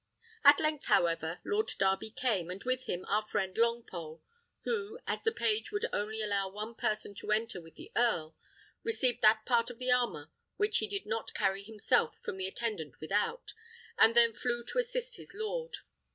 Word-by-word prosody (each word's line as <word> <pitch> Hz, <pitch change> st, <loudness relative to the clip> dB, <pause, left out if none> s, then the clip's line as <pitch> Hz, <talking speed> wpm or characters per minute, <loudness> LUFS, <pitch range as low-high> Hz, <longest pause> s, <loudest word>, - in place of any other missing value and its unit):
At 285 Hz, 0 st, +9 dB
length, 310 Hz, -2 st, 0 dB
however, 165 Hz, 0 st, +2 dB
Lord 425 Hz, +1 st, +1 dB
Darby 195 Hz, +2 st, +1 dB
came, 215 Hz, -7 st, -1 dB
and 185 Hz, +2 st, -6 dB
with 255 Hz, 0 st, -1 dB
him 180 Hz, +1 st, -3 dB
our 210 Hz, +1 st, +2 dB
friend 190 Hz, -3 st, -2 dB
Longpole, 225 Hz, -9 st, -1 dB, 0.4 s
who, 445 Hz, -1 st, -2 dB
as -, -, -2 dB
the 450 Hz, -, +3 dB
page 430 Hz, -1 st, 0 dB
would 415 Hz, +2 st, -1 dB
only 215 Hz, +1 st, -1 dB
allow 200 Hz, -2 st, 0 dB
one 210 Hz, +4 st, -6 dB
person 215 Hz, -2 st, -2 dB
to 200 Hz, -, -5 dB
enter 215 Hz, -4 st, 0 dB
with 165 Hz, -1 st, -16 dB
the -, -, -11 dB
earl, 170 Hz, -10 st, +1 dB, 0.5 s
received 260 Hz, -, +1 dB
that 215 Hz, 0 st, +5 dB
part 235 Hz, -1 st, +2 dB
of 245 Hz, -, -9 dB
the 255 Hz, +1 st, 0 dB
armour 240 Hz, -12 st, +1 dB, 0.3 s
which 415 Hz, +1 st, +2 dB
he 215 Hz, -, -1 dB
did 200 Hz, 0 st, -4 dB
not 220 Hz, +1 st, -3 dB
carry 195 Hz, -1 st, +1 dB
himself 205 Hz, -6 st, +1 dB
from -, -, -5 dB
the 190 Hz, 0 st, -2 dB
attendant 190 Hz, -, -3 dB
without, 210 Hz, -, -1 dB, 0.4 s
and 230 Hz, -, +6 dB
then 235 Hz, -1 st, +6 dB
flew 240 Hz, +1 st, -2 dB
to -, -, +1 dB
assist -, -, -1 dB
his -, -, -12 dB
lord. 480 Hz, +3 st, -3 dB
225 Hz, 180 wpm, -32 LUFS, 195-260 Hz, 0.5 s, At